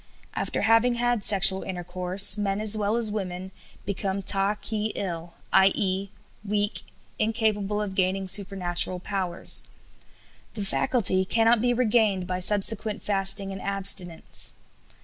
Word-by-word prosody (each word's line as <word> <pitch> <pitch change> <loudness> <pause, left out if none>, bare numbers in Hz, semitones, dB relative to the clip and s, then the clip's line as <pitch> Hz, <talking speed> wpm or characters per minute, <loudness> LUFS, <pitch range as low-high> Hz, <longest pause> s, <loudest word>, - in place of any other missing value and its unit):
After - - -3
having 230 +2 +3
had 240 -2 -1
sexual 195 -2 +4
intercourse 185 +1 +1
men 200 -1 -2
as 215 0 +5
well 210 0 -1
as 230 -3 0
women, 190 -2 -5 0.3
become 195 0 -3
t - - +1 0.3
'k - - -6
e - - -5
'el, 170 -3 -5 0.2
i.e., 195 0 +2 0.3
weak, 205 0 -2 0.4
incapable 215 -2 -1
of 205 -2 -4
gaining 190 0 -1
supernatural 185 -2 +1
powers. 185 -2 -3 0.9
The 205 -2 -4
faculty 195 -3 +1
cannot 225 +3 +2
be 245 0 +1
regained 220 -6 +1
by 180 0 -4
subsequent 210 +2 +2
fasting 195 0 +3
and 195 0 -7
abstinence." 190 -4 -1
200 Hz, 130 wpm, -25 LUFS, 190-215 Hz, 0.9 s, as